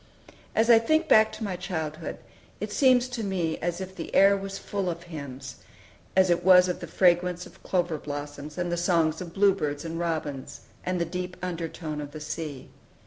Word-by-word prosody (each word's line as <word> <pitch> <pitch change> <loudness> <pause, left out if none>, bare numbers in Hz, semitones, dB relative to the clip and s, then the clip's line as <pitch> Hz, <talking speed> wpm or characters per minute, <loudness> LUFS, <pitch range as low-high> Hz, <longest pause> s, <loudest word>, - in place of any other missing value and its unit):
As 225 +2 +4
I 225 - +8
think 315 +8 +2
back 220 0 +6
to - - -6
my 195 -3 -2
childhood, 160 -3 -4 0.4
it 210 +1 -4
seems 255 +1 +4
to 245 -3 -4
me 180 -5 -1
as 175 +1 -2
if 190 0 -7
the 165 - -6
air 195 +1 +7
was 195 0 -5
full 195 -2 -3
of 170 0 -5
hymns, 140 -6 -8 0.6
as 185 -1 +5
it 175 0 +1
was 180 0 +7
of 180 - -2
the 170 - -7
fragrance 180 +1 +2
of - - -16
clover 175 -4 0
blossoms, 145 +1 -6
and 175 -1 -1
the 175 - 0
songs 165 -2 +2
of 175 -2 -6
bluebirds 185 -7 +2
and 165 0 -4
robins, 155 -5 -3 0.2
and 180 0 -1
the 170 - +1
deep 180 0 -5
undertone 165 -3 -4
of 145 0 -8
the 155 - -6
sea. 150 -2 -6
175 Hz, 195 wpm, -27 LUFS, 155-190 Hz, 0.6 s, I